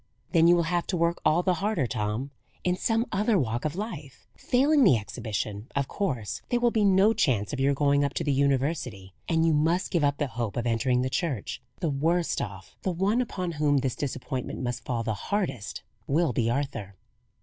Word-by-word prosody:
"Then 165 Hz, -2 st, +5 dB
you 175 Hz, -, +7 dB
will 170 Hz, -, +2 dB
have 170 Hz, +1 st, -1 dB
to 185 Hz, -, -1 dB
work 170 Hz, +1 st, +1 dB
all 170 Hz, +3 st, +3 dB
the 185 Hz, -, +2 dB
harder, 205 Hz, -9 st, +1 dB
Tom, 110 Hz, +4 st, -2 dB, 0.3 s
in 180 Hz, 0 st, +1 dB
some 225 Hz, +4 st, +1 dB
other 210 Hz, +2 st, +2 dB
walk 120 Hz, -3 st, -1 dB
of 155 Hz, -, -1 dB
life. 170 Hz, -, -7 dB
Failing 280 Hz, +3 st, +3 dB
the 140 Hz, -, +6 dB
exhibition, 105 Hz, 0 st, -4 dB
of 140 Hz, -1 st, 0 dB
course 130 Hz, -, -3 dB
there 245 Hz, -, +2 dB
will 240 Hz, 0 st, +3 dB
be 220 Hz, -2 st, +2 dB
no 200 Hz, +2 st, +5 dB
chance 120 Hz, -, +1 dB
of 140 Hz, -, -3 dB
your 140 Hz, +1 st, +2 dB
going 145 Hz, 0 st, +3 dB
up 140 Hz, -, -1 dB
to -, -, -1 dB
the 145 Hz, -, +1 dB
university; 135 Hz, -, 0 dB, 0.2 s
and 165 Hz, -1 st, +3 dB
you 165 Hz, -, +3 dB
must 165 Hz, +5 st, +1 dB
give 170 Hz, -4 st, +1 dB
up 145 Hz, 0 st, +2 dB
the 145 Hz, -, 0 dB
hope 115 Hz, -5 st, -4 dB
of 120 Hz, -, -1 dB
entering 125 Hz, +2 st, +1 dB
the 130 Hz, -, -1 dB
Church. 145 Hz, -, -2 dB, 0.2 s
The 165 Hz, -4 st, 0 dB
worst 165 Hz, +5 st, +1 dB
off 95 Hz, -4 st, -7 dB
the -, -, -1 dB
one 195 Hz, +7 st, +1 dB
upon 185 Hz, -7 st, -3 dB
whom 150 Hz, -2 st, +2 dB
this 130 Hz, -2 st, 0 dB
disappointment 130 Hz, -2 st, -4 dB
must 125 Hz, -1 st, -3 dB
fall 120 Hz, -2 st, -2 dB
the 110 Hz, -1 st, -1 dB
hardest 135 Hz, -, -3 dB, 0.2 s
will 155 Hz, -1 st, +2 dB
be 115 Hz, 0 st, +1 dB
Arthur." 120 Hz, -7 st, -3 dB
145 Hz, 205 wpm, -27 LUFS, 125-180 Hz, 0.3 s, you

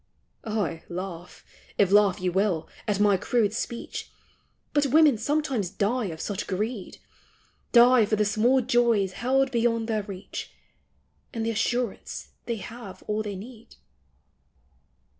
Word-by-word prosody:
Aye, 205 Hz, -7 st, -2 dB
laugh, 180 Hz, -1 st, -7 dB, 0.3 s
if 195 Hz, -2 st, +3 dB
laugh 205 Hz, -2 st, +5 dB
you 180 Hz, 0 st, 0 dB
will, 190 Hz, -3 st, 0 dB, 0.2 s
at 205 Hz, -2 st, 0 dB
my 205 Hz, -2 st, +4 dB
crude 210 Hz, +1 st, +1 dB
speech 235 Hz, +1 st, -5 dB, 0.6 s
Bat 290 Hz, -1 st, +3 dB
women 300 Hz, 0 st, +5 dB
sometimes 270 Hz, -, 0 dB
die 220 Hz, +6 st, 0 dB
of 160 Hz, -4 st, -5 dB
such 200 Hz, +2 st, -3 dB
a -, -, -7 dB
greed,— 210 Hz, +2 st, -3 dB, 0.7 s
Die 240 Hz, -1 st, +7 dB
for 215 Hz, -, +2 dB
the 210 Hz, 0 st, +1 dB
small 230 Hz, +6 st, +3 dB
joys 235 Hz, -5 st, +2 dB
held 265 Hz, +6 st, +1 dB
beyond 230 Hz, -2 st, +1 dB
their 220 Hz, -2 st, 0 dB
reach, 195 Hz, -1 st, -8 dB, 0.8 s
And 225 Hz, -1 st, -2 dB
the 230 Hz, -, 0 dB
assurance 230 Hz, 0 st, -2 dB, 0.2 s
they 235 Hz, -, -1 dB
have 220 Hz, -1 st, -9 dB
all 210 Hz, +1 st, -1 dB
they 205 Hz, -2 st, -4 dB
need 225 Hz, +4 st, -11 dB
215 Hz, 140 wpm, -26 LUFS, 195-240 Hz, 0.8 s, Die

